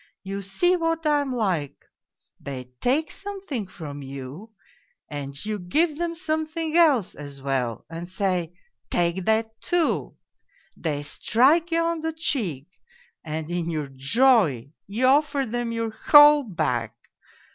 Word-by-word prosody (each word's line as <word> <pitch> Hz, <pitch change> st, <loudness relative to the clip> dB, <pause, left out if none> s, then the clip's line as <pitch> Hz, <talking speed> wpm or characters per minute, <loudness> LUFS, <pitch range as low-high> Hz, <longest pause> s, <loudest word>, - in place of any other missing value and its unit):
You 195 Hz, +1 st, -4 dB
see 275 Hz, -, +2 dB
what 330 Hz, -1 st, -1 dB
I 295 Hz, -1 st, +3 dB
am 275 Hz, -2 st, -3 dB
like; 180 Hz, -, -2 dB, 0.5 s
they 130 Hz, -3 st, -7 dB
take 295 Hz, +5 st, +1 dB
something 390 Hz, -, -5 dB
from 145 Hz, -6 st, -8 dB
you, 135 Hz, -, -8 dB, 0.6 s
and 140 Hz, -2 st, -6 dB
you 215 Hz, -1 st, -2 dB
give 300 Hz, -, +1 dB
them 340 Hz, -1 st, -2 dB
something 315 Hz, -1 st, -2 dB
else 295 Hz, -, +4 dB
as 145 Hz, -2 st, -9 dB
well 130 Hz, -4 st, -2 dB
and 165 Hz, +2 st, -7 dB
say, 180 Hz, -3 st, -1 dB, 0.2 s
' -, -, -60 dB
Take 175 Hz, +1 st, 0 dB
that, 220 Hz, 0 st, 0 dB
too.' 350 Hz, -2 st, 0 dB, 0.6 s
They 145 Hz, -3 st, -3 dB
strike 275 Hz, -, +2 dB
you 335 Hz, 0 st, +2 dB
on 335 Hz, 0 st, -1 dB
the 320 Hz, 0 st, -2 dB
cheek 215 Hz, -, -1 dB, 0.6 s
and 160 Hz, +1 st, -5 dB
in 175 Hz, -1 st, -2 dB
your 155 Hz, -4 st, -3 dB
joy 145 Hz, -, +3 dB, 0.2 s
you 220 Hz, +6 st, 0 dB
offer 285 Hz, +1 st, +3 dB
them 240 Hz, 0 st, -3 dB
your 230 Hz, -1 st, -2 dB
whole 295 Hz, +5 st, +7 dB
back. 125 Hz, -, -2 dB
215 Hz, 140 wpm, -25 LUFS, -, 0.6 s, whole